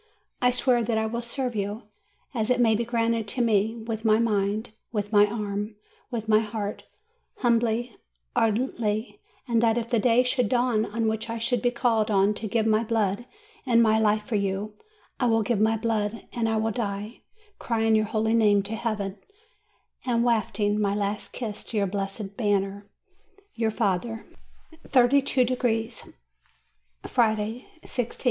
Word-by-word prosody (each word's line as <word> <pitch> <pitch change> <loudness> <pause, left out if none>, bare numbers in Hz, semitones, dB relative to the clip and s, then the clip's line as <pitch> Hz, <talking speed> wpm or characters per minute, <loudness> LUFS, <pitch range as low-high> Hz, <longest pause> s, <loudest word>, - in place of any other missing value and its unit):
I 250 - +5
swear 250 -1 +2
that 225 0 0
I 220 - +1
will 235 +2 -3
serve 245 0 -3
you, 205 +2 -3 0.5
as 225 -2 -1
it 250 0 +2
may 230 -2 +4
be 225 +2 +1
granted 230 -1 0
to 245 +5 -2
me, 220 0 +2
with 225 -1 -5
my 215 -1 +4
mind, 215 -1 0 0.2
with 210 -1 -3
my 205 0 +6
arm, 210 0 -4 0.3
with 230 -3 -4
my 215 -1 +5
heart, 210 -2 -4 0.6
humbly, 235 -1 +1 0.4
ardently; 220 -1 0 0.3
and 230 -2 +2
that, 230 0 +3
if 235 0 -3
the 235 - +3
day 240 +2 +4
should 250 -3 +1
dawn 240 -3 +2
in 225 +1 -2
which 220 +1 -2
I 230 - -3
should 235 0 0
be 245 - +3
called 235 -3 +1
on 200 0 +3
to 215 +1 -5
give 220 +1 0
my 220 0 +3
blood 220 0 -1 0.4
and 235 -3 +4
my 220 0 +4
life 215 -1 +2
for 225 - -7
you, 200 +1 -1 0.5
I 245 - +2
will 225 -1 +3
give 215 -1 0
my 220 +1 +3
blood, 220 -1 -2
and 230 -2 0
I 220 - +1
will 220 +1 0
die, 210 0 -4 0.4
crying 225 -1 +1
your 215 0 +3
holy 220 +1 0
name 210 -3 +4
to 210 +3 -4
heaven, 210 -4 -3 0.8
and 235 -2 +1
wafting 215 -3 +1
my 200 -1 +1
last 205 0 -2
kiss 215 -4 -5
to 225 - -4
your 200 - +2
blessed 195 +1 -4
banner." 200 -2 -1 0.7
YOUR 225 -1 0
FATHER. 220 +2 -1 0.6
THIRTY 260 +1 +5
TWO 260 -2 +2
DEGREES 235 -2 -1 0.9
Friday, 220 0 0 0.2
i6th. 245 -2 -4
220 Hz, 165 wpm, -26 LUFS, 210-235 Hz, 0.9 s, my